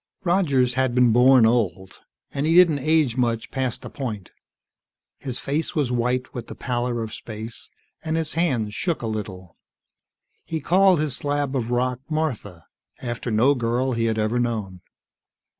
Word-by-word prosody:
Rogers 145 Hz, -9 st, +2 dB
had 130 Hz, -1 st, 0 dB
been 125 Hz, -2 st, +5 dB
born 125 Hz, 0 st, +6 dB
old, 105 Hz, -5 st, 0 dB, 0.3 s
and 140 Hz, +2 st, -1 dB
he 165 Hz, -, +3 dB
didn't 170 Hz, -5 st, +6 dB
age 150 Hz, -4 st, +2 dB
much 115 Hz, -2 st, -1 dB
past 130 Hz, -3 st, -3 dB
a -, -, -6 dB
point. 110 Hz, -9 st, -5 dB, 0.9 s
His 130 Hz, -4 st, -4 dB
face 150 Hz, +5 st, -2 dB
was 145 Hz, -6 st, 0 dB
white 125 Hz, +1 st, -1 dB
with 120 Hz, -2 st, -6 dB
the -, -, -8 dB
pallor 120 Hz, -2 st, -2 dB
of 110 Hz, -, -7 dB
space, 110 Hz, +1 st, -8 dB, 0.3 s
and 160 Hz, 0 st, -1 dB
his 160 Hz, -2 st, -1 dB
hands 130 Hz, -11 st, 0 dB
shook 170 Hz, -, -2 dB
a -, -, -1 dB
little. 100 Hz, -5 st, -6 dB, 0.9 s
He 160 Hz, -, -4 dB
called 185 Hz, +3 st, +4 dB
his 150 Hz, -4 st, -1 dB
slab 145 Hz, -1 st, -2 dB
of 120 Hz, -3 st, -1 dB
rock 125 Hz, 0 st, 0 dB
Martha, 120 Hz, -, -3 dB, 0.3 s
after 120 Hz, 0 st, -4 dB
no 115 Hz, +6 st, +4 dB
girl 125 Hz, +1 st, 0 dB
he 115 Hz, -2 st, 0 dB
had 110 Hz, -1 st, 0 dB
ever 110 Hz, +3 st, 0 dB
known. 105 Hz, -7 st, -3 dB
125 Hz, 160 wpm, -23 LUFS, 115-145 Hz, 0.9 s, born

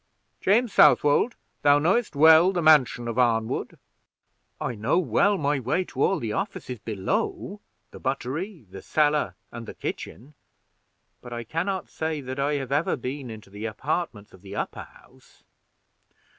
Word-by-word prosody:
James 225 Hz, +4 st, +2 dB
Southwold, 150 Hz, +11 st, +5 dB, 0.3 s
thou 145 Hz, 0 st, +5 dB
knowest 190 Hz, +7 st, +1 dB
well 160 Hz, +4 st, +7 dB
the 180 Hz, -2 st, -1 dB
mansion 135 Hz, -6 st, +4 dB
of 115 Hz, +1 st, -2 dB
Arnwood?" 115 Hz, -2 st, 0 dB, 0.8 s
"I 125 Hz, -, -2 dB
know 110 Hz, +8 st, 0 dB
well 200 Hz, +2 st, +2 dB
my 145 Hz, -3 st, 0 dB
way 130 Hz, +9 st, 0 dB
to 135 Hz, -6 st, -7 dB
all -, -, +3 dB
the 110 Hz, -2 st, -3 dB
offices 125 Hz, +2 st, -4 dB
below 115 Hz, -, -3 dB, 0.3 s
the -, -, -11 dB
buttery, 140 Hz, -, -4 dB
the 95 Hz, -, -9 dB
cellar, 150 Hz, -1 st, +1 dB, 0.2 s
and 115 Hz, -1 st, -8 dB
the -, -, -8 dB
kitchen; 135 Hz, +8 st, -7 dB, 0.9 s
but 120 Hz, -, -11 dB
I 120 Hz, 0 st, -4 dB
can 165 Hz, -, -3 dB
not 190 Hz, -2 st, -2 dB
say 160 Hz, -1 st, -3 dB
that 130 Hz, 0 st, -6 dB
I 145 Hz, +2 st, +1 dB
have 135 Hz, -2 st, -3 dB
ever 145 Hz, +4 st, +1 dB
been 130 Hz, 0 st, -6 dB
into 110 Hz, -3 st, -11 dB
the 105 Hz, +2 st, -7 dB
apartments 115 Hz, -, -3 dB
of 95 Hz, -, -16 dB
the 100 Hz, 0 st, -9 dB
upper -, -, -4 dB
house." -, -, -22 dB
140 Hz, 155 wpm, -25 LUFS, 120-160 Hz, 0.9 s, well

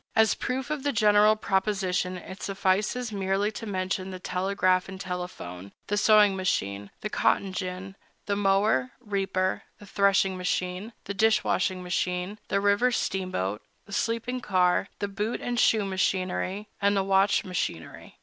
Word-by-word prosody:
As 220 Hz, -1 st, +5 dB
proof 265 Hz, +2 st, -3 dB
of 305 Hz, -2 st, -2 dB
the 285 Hz, +1 st, 0 dB
general 210 Hz, -1 st, +5 dB
proposition, 190 Hz, -3 st, 0 dB
it 190 Hz, +2 st, -10 dB
suffices 200 Hz, +5 st, 0 dB
merely 195 Hz, +1 st, 0 dB
to 225 Hz, +1 st, -7 dB
mention 185 Hz, 0 st, -2 dB
the 185 Hz, -, -6 dB
telegraph 185 Hz, 0 st, 0 dB
and 190 Hz, -1 st, -8 dB
telephone, 180 Hz, -, -6 dB
the 205 Hz, -, -1 dB
sewing 210 Hz, -1 st, +5 dB
machine, 100 Hz, -, -1 dB
the 210 Hz, -, -3 dB
cotton 195 Hz, -1 st, +1 dB
gin, 185 Hz, +1 st, -5 dB, 0.3 s
the 200 Hz, -, 0 dB
mower, 195 Hz, -10 st, +2 dB
reaper, 195 Hz, -4 st, -1 dB, 0.2 s
and 205 Hz, -, -13 dB
threshing 195 Hz, -1 st, +2 dB
machine, 180 Hz, +3 st, -2 dB
the 200 Hz, -, -5 dB
dish 215 Hz, +2 st, +3 dB
washing 185 Hz, 0 st, 0 dB
machine, 180 Hz, +3 st, -2 dB
the 200 Hz, -, +1 dB
river 205 Hz, +5 st, +3 dB
steamboat, 185 Hz, -, -2 dB, 0.2 s
the 200 Hz, -, -11 dB
sleeping 230 Hz, +4 st, -1 dB
car, 185 Hz, -3 st, +2 dB
the 205 Hz, -, -2 dB
boot 210 Hz, +3 st, -3 dB
and 245 Hz, -1 st, -2 dB
shoe 215 Hz, -2 st, +4 dB
machinery, 190 Hz, +1 st, -1 dB
and 200 Hz, 0 st, +3 dB
the 195 Hz, -, +2 dB
watch 195 Hz, +1 st, +3 dB
machinery. 175 Hz, -, -5 dB
195 Hz, 150 wpm, -27 LUFS, 185-210 Hz, 0.3 s, As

